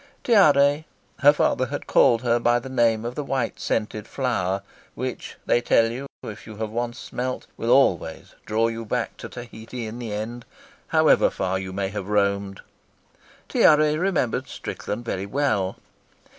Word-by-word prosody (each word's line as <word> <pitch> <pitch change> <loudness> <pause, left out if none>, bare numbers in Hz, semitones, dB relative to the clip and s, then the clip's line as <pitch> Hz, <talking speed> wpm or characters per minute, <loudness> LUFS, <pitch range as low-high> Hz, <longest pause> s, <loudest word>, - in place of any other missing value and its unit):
Tiare 150 - +5 0.3
her 145 0 +7
father 130 -3 +1
had 145 +2 -5
called 120 -3 +4
her 120 -1 +2
by 120 +1 +3
the 120 +2 -6
name 115 -3 +2
of 120 - -3
the 150 - -4
white, 135 -4 -2
scented 110 -1 -2
flower 100 -8 -1 0.3
which, - - -5
they 120 - +3
tell 115 -1 +3
you, 130 +4 -6 0.2
if 105 0 -8
you 110 - -9
have 110 0 -4
once 120 +1 -3
smelt, 130 +1 -4
will 115 - -3
always 95 -11 +2
draw 110 +2 +2
you 115 0 -4
back 110 - -2
to - - -8
Tahiti 120 0 -8
in 110 +2 -7
the 115 -3 -5
end, 110 +3 -4 0.4
however - - +4
far 95 0 -2
you 95 0 -6
may 95 0 -2
have 100 -1 -5
roamed 100 -1 0 0.9
Tiare 150 0 +4
remembered 170 -8 0
Strickland 115 +3 -6
very 95 -3 -3
well. 100 -7 0
115 Hz, 160 wpm, -24 LUFS, 105-130 Hz, 0.9 s, her